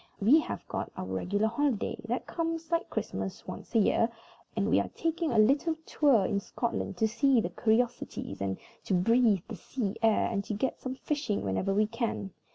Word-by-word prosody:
We 245 +11 +6
have - - -5
got - - -4
our - - -3
regular 180 - 0
holiday, 235 0 0
that 240 +3 -2
comes, 330 -1 -3
like 335 0 0
Christmas, - - -4
once - - -8
a - - +7
year, 225 +2 +3 0.5
and - - +1
we - - +4
are - - -1
taking 330 -1 -1
a 235 - +1
little 280 +9 +4
tour 265 -10 +3
in 200 - 0
Scotland 200 -2 -3
to 220 - +3
see 240 +3 +3
the - - -1
curiosities, 230 - -1
and 95 -1 -1 0.3
to 190 - +1
breathe 220 0 +3
the 225 - -6
sea 205 +2 -3
air, 225 -2 +4
and 200 -3 -1
to 215 - -3
get 255 +6 -1
some 255 0 -4
fishing 285 -7 -2
whenever 100 - 0
we 210 +2 +3
can. 230 -3 -3
230 Hz, 190 wpm, -30 LUFS, 200-270 Hz, 0.5 s, a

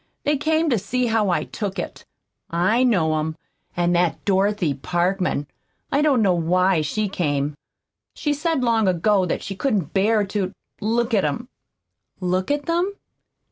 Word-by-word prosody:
They 295 - +2
came 315 +3 +1
to 235 - +2
see 250 +6 -1
how 220 -3 +2
I 175 - +1
took 200 -3 -5
it. - - -6 0.4
I 185 +8 +2
know 160 -10 +2
'em. 155 +1 -3 0.4
And 175 0 +2
that 175 -1 0
Dorothy 195 -4 +2
Parkman 175 +2 -1 0.5
I 280 - +2
don't 275 -7 +3
know 190 -3 +4
WHY 180 +1 +2
she 210 +8 -1
came. 145 -6 -1 0.6
She 295 -2 0
said 305 -2 0
long 225 -3 +2
ago 185 +2 +2
that - - -2
she 195 - -5
couldn't 195 - -1
bear 210 +2 +3
to 195 -1 -2 0.3
look 230 +3 0
at 200 - +3
'em." 155 - -2 0.7
"Look 185 0 -1
at 290 0 0
them?" 350 +4 0
195 Hz, 160 wpm, -22 LUFS, 175-240 Hz, 0.7 s, know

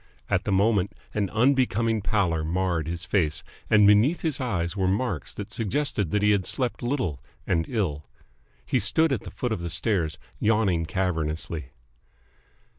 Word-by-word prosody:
At - - +1
the - - -1
moment 100 0 +2 0.2
an 100 -3 0
unbecoming 115 -2 +2
pallor 95 -7 0
marred 85 -1 -1
his 85 +1 -4
face, 80 -6 0 0.3
and 105 -2 +6
beneath 105 +11 +4
his 155 -5 0
eyes 90 -8 -1
were 95 -2 0
marks 95 - -1
that 105 0 -7
suggested 115 - -1
that 105 +4 0
he 105 - +5
had 100 -2 +2
slept 125 +5 -2
little 120 - -2 0.2
and 80 -3 0
ill. 90 - -1 0.6
He - - +1
stood 160 -1 +4
at 125 -7 0
the - - -8
foot 125 - -3
of 110 - -1
the 85 - -3
stairs, 85 -2 0 0.2
yawning 100 -7 +2
cavernously. 80 -4 -2
100 Hz, 160 wpm, -26 LUFS, 85-115 Hz, 0.6 s, and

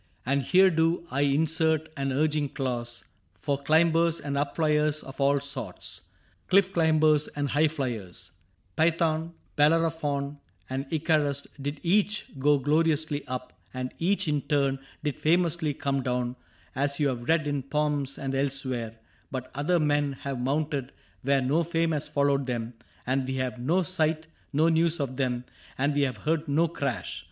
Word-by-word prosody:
^ - - -37 0.2
And 140 +2 +2
here 185 +8 +5
do 165 +1 +1
I 140 - 0
insert 160 +2 +2
an 135 -1 -1
urging 150 +1 +1
clause 120 -3 -4 0.4
For 140 -2 -1
climbers 165 +2 +3
and 140 -1 -4
up 140 0 -1
fliers 150 -1 +2
of 135 +1 -8
all 140 +1 +4
sorts, 140 0 -5 0.5
CliflF 195 0 +4
climbers 155 -2 +3
and 145 -1 -1
high 150 +4 +3
fliers: 110 - -4 0.4
Phaethon, 165 0 +1 0.2
Bellerophon, 150 -2 +1 0.3
and 135 +1 -3
Icarus 150 -3 +1 0.2
did 145 +1 -4
each 205 +4 +1
Go 145 +2 +4
gloriously 150 +1 +1
up, 125 0 -5 0.2
and 130 0 -4
each 185 +1 +1
in 150 -1 +1
turn 140 -2 +1 0.2
Did 150 -3 -2
famously 165 -2 +1
come 140 -2 -1
down 125 -1 -1 0.2
— - - -31
as 140 +1 -1
you 145 - +3
have 120 0 -5
read 160 -1 +3
In 145 -1 -1
poems 145 0 -1
and 135 -1 -3
elsewhere; 130 -4 -2 0.3
but 130 -1 -5
other 165 +5 +1
men 145 -2 +1
Have 135 -1 -5
mounted 140 +1 -1 0.3
where 135 +1 +2
no 140 +6 +2
fame 165 0 0
has 150 -2 -1
followed 140 -1 +1
them, 120 -1 -3 0.3
And 130 +1 0
we 130 - -2
have 130 -1 -1
had 120 - -7
no 180 +4 +3
sight, 160 -3 0 0.3
no 155 +3 +3
news 165 0 +2
of 130 -3 -3
them, 125 -2 -1 0.3
And 140 +2 +1
we 145 - +1
have 130 -3 0
heard 160 0 0
no 155 +4 +3
crash. 140 - -3
145 Hz, 165 wpm, -27 LUFS, 135-160 Hz, 0.5 s, here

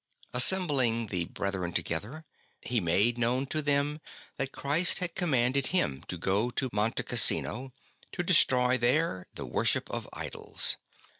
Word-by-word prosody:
Assembling 130 -5 +2
the 90 -2 0
brethren 95 -2 -4
together, 115 - -4 0.4
he 120 -3 -1
made 100 +8 +1
known 125 +3 0
to 155 +3 -2
them 145 +1 -1 0.4
that 135 - -2
Christ 155 +6 +3
had 180 -2 +2
commanded 135 -6 +1
him 70 - +1
to 90 - -5
go 100 +7 -1
to 125 +1 -2
Monte 105 +2 0
Cassino, 130 +2 +2 0.4
to - - -4
destroy 125 0 +3
there 120 - 0
the - - -7
worship - - -1
of - - -6
idols. - - -1
125 Hz, 140 wpm, -28 LUFS, 105-145 Hz, 0.4 s, Christ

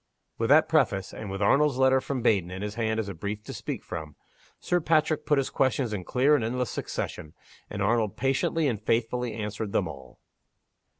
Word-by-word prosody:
With - - 0
that - - +6
preface, 95 -1 +1
and 105 -1 -7
with 95 +1 -2
Arnold's 140 +4 +3
letter 130 0 +4
from 130 -3 -3
Baden 95 -7 +2
in 95 +2 -6
his 105 0 -3
hand 110 0 -1
as 110 - -2
a 100 - -4
brief 100 +5 -5
to - - -7
speak - - -5
from, 75 -3 -7 0.4
Sir 175 - +1
Patrick 155 0 +1
put 150 - +3
his 135 - 0
questions 130 -3 +1
in 95 -4 -4
clear 135 +4 +3
and 145 -6 +3
endless 125 +1 -1
succession; 75 - -5 0.3
and 100 -1 -3
Arnold 110 -1 +1
patiently 135 +4 +1
and 110 -6 -2
faithfully 115 +1 0
answered 105 -1 -4
them - - +1
all. 70 -4 -11
110 Hz, 195 wpm, -27 LUFS, 100-130 Hz, 0.4 s, that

